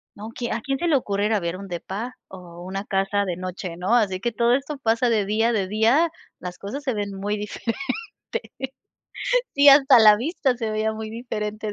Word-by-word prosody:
¿no? 215 +2 -8
Que 240 -1 -3
¿A 230 - -1
quién 270 +3 -2
se 345 - -1
le 310 - +4
ocurre 205 -4 -1
ir 220 - 0
a 210 - +2
ver 170 0 -3
un 200 0 -8
depa 200 +8 -5
o 175 -2 -11
una 195 +2 -4
casa 195 +1 0
de 180 -2 -3
noche, 185 -1 -6
no? 190 +7 +1
Así 195 -5 +2
que 240 +4 -1
todo 235 +2 +3
esto 280 +1 -4
pasa 235 0 +1
de 215 -3 +2
día, 225 +3 +1
de 195 -3 0
día 230 - +3 0.3
las 180 -1 -7
cosas 260 +9 -6
se 260 -4 -1
ven 205 -1 -3
muy 205 +2 -2
diferente. 210 +2 -4 1.8
Sí, 285 +1 +6
hasta 275 -2 +8
la 215 -1 +8
vista 265 - 0
se 225 -2 -3
veía 215 0 0
muy 220 0 -6
diferente 215 -2 -4
215 Hz, 210 wpm, -23 LUFS, 195-240 Hz, 1.8 s, hasta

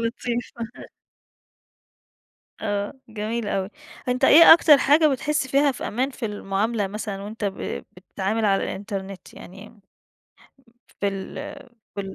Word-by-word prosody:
لطيفة. 235 +1 -4 2.0
أ 205 -1 -2 0.2
جميل 220 +1 -3
أوي. 195 0 -2 0.4
أنت 250 +1 -1
إيه 330 +4 +10
أكتر 315 -3 +6
حاجة 300 +3 +4
بتحس 295 0 -1
فيها 280 +1 +3
في - - -6
أمان 255 +5 -1
في 255 -3 -6
المعاملة 205 +1 -2
مثلًا 205 -1 -5
وأنت 210 0 -5
ب 195 - -4
بتتعامل 200 +4 -2
على 195 -1 +2
الإنترنت؟ 195 -1 -6
يعني 195 +4 -12
م 220 - -22 1.2
في 200 - +1
ال 195 -1 -6 0.6
في 200 - -3
215 Hz, 125 wpm, -23 LUFS, 200-255 Hz, 2.0 s, إيه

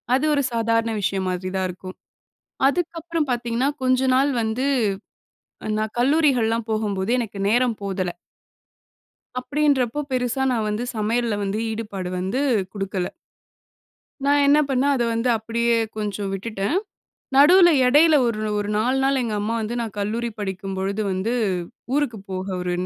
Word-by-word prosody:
அது 270 - +1
ஒரு 285 - +2
சாதாரண 230 0 +1
விஷயம் 195 -1 -1
மாதிரி 185 0 -3
தான் 185 - 0
இருக்கும். 185 +1 -9 0.7
அதுக்கப்புறம் 330 -1 -2
பாத்தீங்கன்னா 240 +2 0
கொஞ்ச 255 0 +3
நாள் 275 +2 +3
வந்து, 225 +5 -1 1.1
நான் 215 0 -3
கல்லூரிகள்லாம் 245 -5 +2
போகும்போது 210 -1 -1
எனக்கு 215 -4 -5
நேரம் 240 0 +2
போதல. 185 -3 -2 1.3
அப்டின்றப்போ 285 -2 +1
பெருசா 255 +1 0
நான் 225 -3 0
வந்து 210 +3 -2
சமையல்ல 225 +1 0
வந்து 200 +2 -2
ஈடுபாடு 210 -5 -4
வந்து 190 +8 -1 0.3
குடுக்கல. 195 -3 -3 1.2
நான் 285 0 +4
என்ன 290 +2 +5
பண்ணேன், 275 +1 +2
அத 245 - +1
வந்து 230 +2 0
அப்டியே 230 +1 0 0.2
கொஞ்சம் 205 -2 -3
விட்டுட்டேன். 200 - -2 0.6
நடுவுல 345 +6 +8 0.2
இடையில 305 +5 +6
ஒரு 225 -2 -1 0.2
ஒரு 205 0 -2
4 250 +5 +1
நாள் 270 0 +2
எங்க 225 -3 -2
அம்மா 220 +3 -1
வந்து 220 +2 -3
நான் 225 -3 -4
கல்லூரி 225 +4 -2
படிக்கும்பொழுது 195 +1 -3
வந்து, 190 +5 -1 0.6
ஊருக்கு 275 -7 0
போக 185 0 -4 0.2
ஒரு 180 0 -2
230 Hz, 135 wpm, -23 LUFS, 200-260 Hz, 1.3 s, நடுவுல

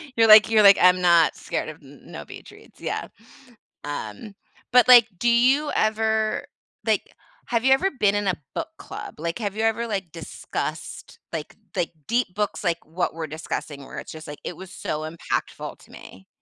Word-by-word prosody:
You're 225 -1 +4
like 215 0 +9
you're 220 -1 +5
like, 200 -1 +8
"I'm 180 0 +5
not 170 -2 +4
scared - - -4
of - - -10
n - - -16
no - - -9
beach - - -12
reads," - - -19
yeah. - - -3 0.8
Um, 145 - -6 0.4
but 250 -1 +6
like, 240 -3 +9
do 240 - +2
you 265 +5 +3
ever 220 0 +1 0.4
like, - - 0 0.3
have 235 -1 0
you 265 - +7
ever 380 +8 +1
been 205 0 +3
in 205 -1 -1
a 185 - +1 0.2
book - - -2
club? - - -9
Like 170 +1 -3
have 205 -2 -3
you 220 - 0
ever, 225 +1 0
like, 195 -6 -4
discussed, 165 -2 -6
like 155 -2 -5 0.2
like, 175 -3 -1 0.2
deep 235 -5 0
books, 210 0 -2
like, 170 -2 -1
what 175 +3 -2
we're 160 -1 -4
discussing 145 -2 -6
where - - -8
it's - - -9
just, 155 0 -10
like, 145 - -8
"It 175 - -6
was 190 -1 -10
so 155 +1 -4
impactful 170 - -4
to - - -19
me"? 95 0 -14
200 Hz, 190 wpm, -24 LUFS, 165-225 Hz, 0.8 s, like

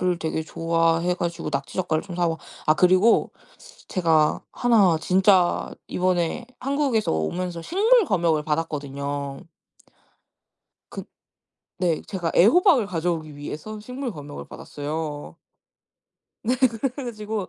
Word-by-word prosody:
을 180 -1 +1
되게 160 -1 -2
좋아해 165 +2 +1
가지고 170 -3 -3
낙지 140 -1 -4
젓갈을 165 -4 0
좀 180 -3 -8
사와 170 -2 0 0.3
아 155 - +5
그리고 185 +6 +4 0.6
제가 160 -5 +2
1 210 -9 +3
진짜 185 0 +3 0.2
이번에 180 +5 -1
한국에서 275 -5 0
오면서 170 - -2
식물 430 - +3
검역을 170 - +1
받았거든요. 140 -3 -3 1.5
그 - - -6 0.7
네. 175 -4 0
제가 175 -5 -3
애호박을 260 - +5
가져오기 165 -3 -2
위해서 155 +9 -7
식물 250 +3 -5
검역을 145 -5 -9
받았어요. 150 0 -6 1.1
네. 245 - +2 0.4
그래가지고 215 -6 -5
175 Hz, 255 characters per minute, -24 LUFS, 155-210 Hz, 1.5 s, 아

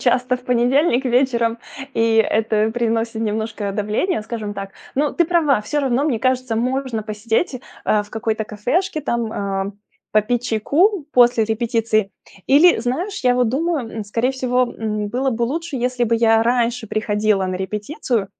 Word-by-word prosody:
часто 250 0 +2
в 250 - -18
понедельник 250 +3 +2
вечером, 235 -2 +1 0.4
и 225 0 +2
это 220 0 +2
приносит 230 -1 -1
немножко 215 -1 -2
давление, 210 - -1
скажем 215 -2 -5
так. 195 -1 -6 0.2
Ну, 290 +2 0
ты 345 - +3
права, 310 -9 +2
всё 295 +8 -1
равно, 265 0 +1
мне 270 -7 0
кажется, 255 -1 0
можно 255 -1 -1
посидеть, 225 +6 -2 0.2
а, 210 - +3
в 205 - -16
какой-то 220 0 -2
кафешке, 310 - -1
там, 235 -5 -2
э, 195 0 -2 0.4
попить 225 +3 +2
чайку 305 - +2
после 240 -2 +5
репетиции. 220 -2 0 0.4
Или, 315 +6 +6
знаешь, 295 - -2
я 250 0 +4
вот 245 -2 +2
думаю, 290 0 -1
м, 215 - -4
скорее 230 +5 0
всего, 255 -1 +1 0.2
м, 210 -1 -2
было 260 +5 0
бы 235 -1 -2
лучше, 315 +4 -3
если 250 0 0
бы 230 0 +1
я 225 -1 +4
раньше 240 0 0
приходила 210 -2 0
на 185 - -3
репетицию, 210 - -2
235 Hz, 160 wpm, -20 LUFS, 215-260 Hz, 0.4 s, Или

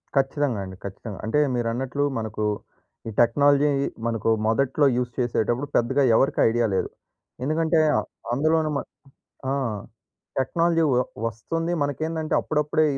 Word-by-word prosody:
ఖచ్చితంగా 135 -3 +1
అండి, 95 0 -8
ఖచ్చితంగా. 100 +1 -7
అంటే 115 +7 +1 0.2
మీరన్నట్లు 125 +4 -1
మనకు 110 -1 -3 0.6
ఈ - - -3
టెక్నాలజీ 145 +3 +4 0.4
మనకు 115 -1 -1 0.2
మొదట్లో 135 +5 +2
యూజ్ 125 -1 -1
చేసేటప్పుడు 120 +2 0
పెద్దగా 135 +4 +3
ఎవరికి 135 +5 +2
ఐడియా 120 +1 +1
లేదు. - - 0 0.5
ఎందుకంటే 160 +3 +2 0.2
అ - - +3 0.3
అందులోనే 155 +4 +2
మన - - -2 0.7
ఆ! - - +1 0.9
టెక్నాలజీ 165 +5 +2
వ - - +3 0.3
వస్తుంది 165 - -3
మనకేందంటే 155 +3 -2
అప్పుడప్పుడే 150 +1 +1
135 Hz, 120 wpm, -24 LUFS, 115-155 Hz, 0.9 s, టెక్నాలజీ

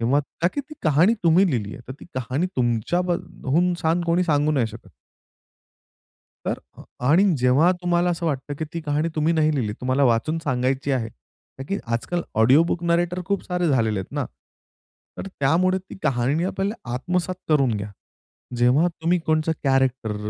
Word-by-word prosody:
तेव्हा 125 +5 +2 0.2
ताकी 185 +12 +1
ती 305 +3 -12
कहाणी 160 +8 +4
तुम्ही 170 +4 +5
लिहिली 105 -6 -2
आहे. 135 - -10
तर - - -4
ती - - -10
कहाणी 130 +6 -1
तुमच्या 120 +7 +1
बद 175 -1 -2 0.2
हून 175 +7 +2
छान 165 +1 +1
कोणी 170 +2 +2
सांगू 150 -1 +2
नाही 130 -6 +1
शकत. 110 -3 -11 1.6
तर - - -2 0.2
अ, - - -10 0.3
आणि 165 +8 +5
जेव्हा 130 +8 +4
तुम्हाला 175 0 +1
असं 170 0 -2
वाटतं, 145 -2 -2
की 160 - -2
ती 170 - -3
कहाणी 150 +2 -1
तुम्ही 155 +2 +2
नाही 155 -1 +2
लिहिली 110 -6 -1
तुम्हाला 130 +2 +1
वाचून 125 +6 +2
सांगायची 130 0 0
आहे. 115 -4 -1 0.5
का 135 - -6
की 195 - 0 0.2
आजकाल 175 +9 -1 0.2
ऑडिओ 130 +8 +6
बुक 170 0 -2
नरेटर 175 +1 +1
खूप 200 +1 -1
सारे 180 -1 -1
झालेले 110 -7 +1
आहेत 95 - -8
ना. - - -1 0.9
तर - - -5
त्यामुळे 185 +3 +1
ती 185 - -12
कहाणी 135 +3 +1
आपल्याला 195 +3 -1 0.2
आत्मसात 180 +7 -1
करून 140 -5 +3
घ्या. 100 +1 -5 0.7
जेव्हा 125 +8 +4
तुम्ही 170 +1 0
कोणचा 155 0 +1
कॅरेक्टर, 130 -5 +1
155 Hz, 170 wpm, -23 LUFS, 130-175 Hz, 1.6 s, ऑडिओ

